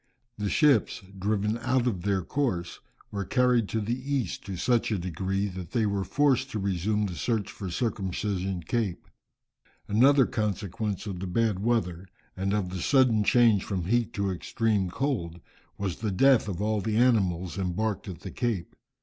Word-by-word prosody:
The 105 Hz, -1 st, -1 dB
ships, 140 Hz, -8 st, +3 dB, 0.2 s
driven 105 Hz, +3 st, 0 dB
out 130 Hz, +1 st, +1 dB
of 105 Hz, -8 st, -1 dB
their 95 Hz, -1 st, 0 dB
course, 95 Hz, -, -2 dB, 0.3 s
were 100 Hz, -1 st, -2 dB
carried 125 Hz, -1 st, +2 dB
to 110 Hz, -, -1 dB
the 110 Hz, +2 st, -1 dB, 0.2 s
east, 120 Hz, -9 st, -2 dB
to 95 Hz, -2 st, -4 dB
such 120 Hz, +5 st, +1 dB
a 105 Hz, -, +1 dB
degree 95 Hz, +3 st, -2 dB
that 90 Hz, -2 st, -8 dB
they 115 Hz, -3 st, +2 dB
were 100 Hz, -1 st, 0 dB
forced 135 Hz, +1 st, +2 dB
to 110 Hz, -, -3 dB
resume 100 Hz, +2 st, 0 dB
the 95 Hz, -, -4 dB
search 105 Hz, +2 st, -1 dB
for 95 Hz, -3 st, -6 dB
Circumcision 95 Hz, -3 st, -2 dB
Cape. 105 Hz, 0 st, -2 dB, 0.8 s
Another 135 Hz, +5 st, +5 dB
consequence 105 Hz, -1 st, -2 dB
of 95 Hz, -4 st, -5 dB
the 95 Hz, -, -4 dB
bad 105 Hz, +1 st, +1 dB
weather, 95 Hz, -5 st, -1 dB, 0.3 s
and 95 Hz, +1 st, -1 dB
of 100 Hz, -3 st, -1 dB
the 90 Hz, -1 st, -4 dB
sudden 125 Hz, -5 st, +4 dB
change 115 Hz, -3 st, +4 dB
from 95 Hz, -4 st, -3 dB
heat 120 Hz, +3 st, +1 dB
to 100 Hz, -1 st, -1 dB
extreme 95 Hz, -, 0 dB
cold 90 Hz, -, -2 dB, 0.4 s
was 95 Hz, -3 st, -3 dB
the 110 Hz, -, -2 dB
death 125 Hz, +5 st, +4 dB
of 100 Hz, 0 st, -3 dB
all 110 Hz, -1 st, 0 dB
the 110 Hz, +1 st, -1 dB
animals 95 Hz, -7 st, +2 dB
embarked 100 Hz, +3 st, -2 dB
at 90 Hz, -4 st, -7 dB
the 95 Hz, -, -7 dB
Cape. 115 Hz, -7 st, -2 dB
105 Hz, 170 wpm, -27 LUFS, 95-115 Hz, 0.8 s, Another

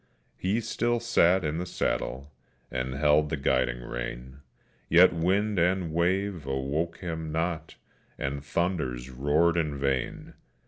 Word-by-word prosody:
He 100 Hz, +5 st, 0 dB
still 120 Hz, +1 st, 0 dB
sat 95 Hz, -7 st, +3 dB
in 75 Hz, +2 st, -1 dB
the 90 Hz, -, -3 dB
saddle, 70 Hz, -2 st, -2 dB, 0.4 s
and 65 Hz, 0 st, -3 dB
held 75 Hz, +1 st, +3 dB
the 80 Hz, -, -1 dB
guiding 65 Hz, -3 st, +1 dB
rein, -, -, -6 dB, 0.5 s
Yet 85 Hz, +3 st, +7 dB
wind 95 Hz, +4 st, +1 dB
and 90 Hz, -1 st, +1 dB
wave 90 Hz, -1 st, 0 dB
awoke 70 Hz, +5 st, -2 dB
him 80 Hz, -3 st, -5 dB
not, 80 Hz, 0 st, -2 dB, 0.4 s
and 70 Hz, +1 st, -3 dB
thunders 75 Hz, -7 st, -2 dB
roared 75 Hz, +6 st, +2 dB
in 75 Hz, -4 st, 0 dB
vain. 70 Hz, -2 st, -2 dB
80 Hz, 130 wpm, -28 LUFS, 70-90 Hz, 0.5 s, Yet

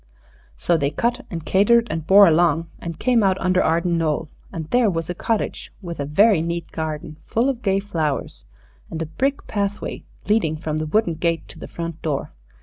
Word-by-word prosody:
So 170 Hz, -, +2 dB
they 140 Hz, -2 st, 0 dB
cut 240 Hz, -, -1 dB
and 165 Hz, -3 st, -6 dB
catered 230 Hz, +5 st, +4 dB
and 160 Hz, -1 st, -4 dB
bore 200 Hz, +1 st, +8 dB
along, 165 Hz, 0 st, +2 dB
and 170 Hz, -2 st, -6 dB
came 245 Hz, +2 st, +2 dB
out 190 Hz, -2 st, +2 dB
under 185 Hz, 0 st, +2 dB
Arden 170 Hz, +1 st, +1 dB
Knoll, 155 Hz, -1 st, -1 dB, 0.2 s
and 160 Hz, -2 st, -5 dB
there 245 Hz, -3 st, +4 dB
was 165 Hz, -2 st, -2 dB
a -, -, -2 dB
cottage, 220 Hz, +5 st, -2 dB
with 170 Hz, -5 st, -7 dB
a 140 Hz, -, -1 dB
very 190 Hz, +5 st, +4 dB
neat 170 Hz, 0 st, -4 dB
garden 155 Hz, -1 st, -5 dB
full 235 Hz, +4 st, +1 dB
of 255 Hz, -3 st, -3 dB
gay 195 Hz, -3 st, +1 dB
flowers, 155 Hz, -, -3 dB, 0.4 s
and 160 Hz, -, -5 dB
a -, -, -4 dB
brick 270 Hz, -, -2 dB
pathway 205 Hz, -1 st, -3 dB, 0.2 s
leading 200 Hz, -7 st, +2 dB
from 155 Hz, -1 st, -3 dB
the 155 Hz, -, -3 dB
wooden 175 Hz, +1 st, +1 dB
gate 165 Hz, +1 st, -1 dB
to -, -, -12 dB
the -, -, -8 dB
front 170 Hz, -1 st, -6 dB
door. 150 Hz, -4 st, -3 dB
170 Hz, 195 wpm, -22 LUFS, 160-205 Hz, 0.4 s, bore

